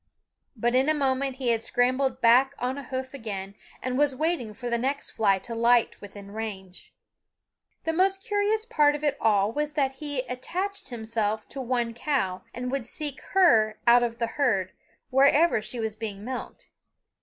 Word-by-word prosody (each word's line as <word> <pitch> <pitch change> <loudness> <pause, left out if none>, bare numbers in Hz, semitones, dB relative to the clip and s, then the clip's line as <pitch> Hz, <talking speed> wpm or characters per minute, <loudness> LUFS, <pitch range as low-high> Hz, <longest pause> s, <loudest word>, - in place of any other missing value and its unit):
But 240 +1 0
in 260 +3 +3
a 310 - +3
moment 270 -1 0
he 260 -2 -2
had 230 -1 +2
scrambled 255 +2 +1
back 245 +3 +5
on 250 +2 -2
a - - -7
hoof 260 0 -5
again 200 -6 -6 0.3
and 255 +1 -1
was 290 -2 +3
waiting 310 -6 -1
for 245 - -6
the 235 0 0
next 275 +3 -2
fly 200 -3 +2
to 230 +5 -8
light 235 +1 +2
within 200 0 -11
range. 200 -4 -7 0.9
The 325 - -1
most 385 +3 +2
curious 425 0 0
part 295 -11 +3
of 295 - -7
it 290 -2 +1
all 210 -1 +3
was 295 +4 -2
that 270 -3 0
he 290 -3 -2
attached 350 +11 -4
himself 220 -2 -2
to 270 - -6
one 240 -2 -1
cow, 230 -8 -1
and 250 +1 -4
would 265 -3 -3
seek 295 0 -4
her 225 - +5
out 240 0 +7
of 235 -1 -1
the 235 - 0
herd 215 -8 0 0.4
wherever 280 +1 +4
she 235 +3 -4
was 220 -1 -2
being 215 -2 -6
milked. 255 0 -6
250 Hz, 180 wpm, -26 LUFS, 225-285 Hz, 0.9 s, out